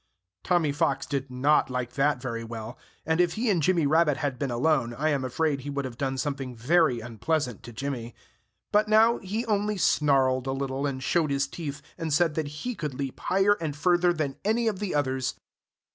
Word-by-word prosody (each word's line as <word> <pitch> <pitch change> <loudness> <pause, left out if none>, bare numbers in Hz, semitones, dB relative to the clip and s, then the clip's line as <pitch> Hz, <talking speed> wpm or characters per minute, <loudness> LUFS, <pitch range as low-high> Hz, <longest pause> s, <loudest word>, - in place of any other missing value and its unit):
Tommy 170 -5 +2
Fox 140 -1 0
did 140 -1 -3
not 135 +4 +2
like 125 -1 -3
that 140 +1 +2
very 115 -2 -4
well. 115 +1 -7 0.3
And 160 +2 +2
if 175 -1 +2
he 225 0 0
and 175 -4 +1
Jimmy 170 0 +2
Rabbit 150 -1 +3
had 140 -5 -2
been 140 - -1
alone 120 -1 +1
I 150 +5 0
am 140 -3 0
afraid 140 +3 0
he 145 - -6
would 140 -1 -2
have 125 -2 -6
done 135 -1 -1
something 135 -2 -3
very 130 0 +2
unpleasant 125 +2 -2
to 120 - -10
Jimmy. 120 -1 -5 0.6
But 210 +1 +3
now 220 +2 +5
he 210 +5 -3
only 210 -1 0
snarled 135 -6 +2
a 135 - 0
little, 135 +1 -2
and 130 -2 -4
showed 160 +1 +1
his 140 0 +1
teeth, 145 -1 -6 0.2
and 165 -1 -3
said 165 +1 +3
that 155 -2 -2
he 150 +13 -5
could 150 - -5
leap 135 -1 -5
higher 195 +3 +3
and 155 -3 -3
further 175 +3 +3
than 155 -5 -2
any 225 +3 +1
of 205 -4 -1
the 200 -6 -2
others. 130 -3 0
145 Hz, 205 wpm, -27 LUFS, 130-170 Hz, 0.6 s, now